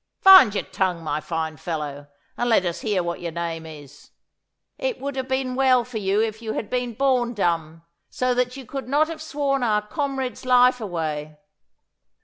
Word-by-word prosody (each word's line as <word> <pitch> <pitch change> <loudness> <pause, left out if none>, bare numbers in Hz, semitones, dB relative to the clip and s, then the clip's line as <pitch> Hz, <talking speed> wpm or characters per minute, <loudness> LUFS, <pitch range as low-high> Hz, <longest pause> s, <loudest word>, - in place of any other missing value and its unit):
Find 375 - +9
your - - 0
tongue, 180 -3 -2
my 150 -1 -2
fine 160 -1 -4
fellow, 145 -2 -5 0.3
and 240 - -1
let 205 -5 +3
us 170 -1 -3
hear 205 -5 0
what 170 0 -4
your 170 -1 -4
name 165 -1 -4
is. 145 -2 -13 0.7
It - - -2
would 280 0 -4
have 260 -1 -3
been 260 -1 -1
well 255 -1 +3
for 245 -3 -5
you 200 0 +1
if 220 0 -4
you 220 -1 -4
had 210 - -5
been 245 -2 -2
born 250 -2 +1
dumb, 165 -4 -1 0.3
so 255 0 0
that 250 +1 -1
you 265 - -9
could 270 +1 -6
not 300 +3 +2
have 320 -1 -7
sworn 285 -3 -1
our 210 -3 +1
comrade's 270 0 -3
life 250 -1 +4
away. 155 -6 -4
225 Hz, 185 wpm, -23 LUFS, 170-260 Hz, 0.7 s, Find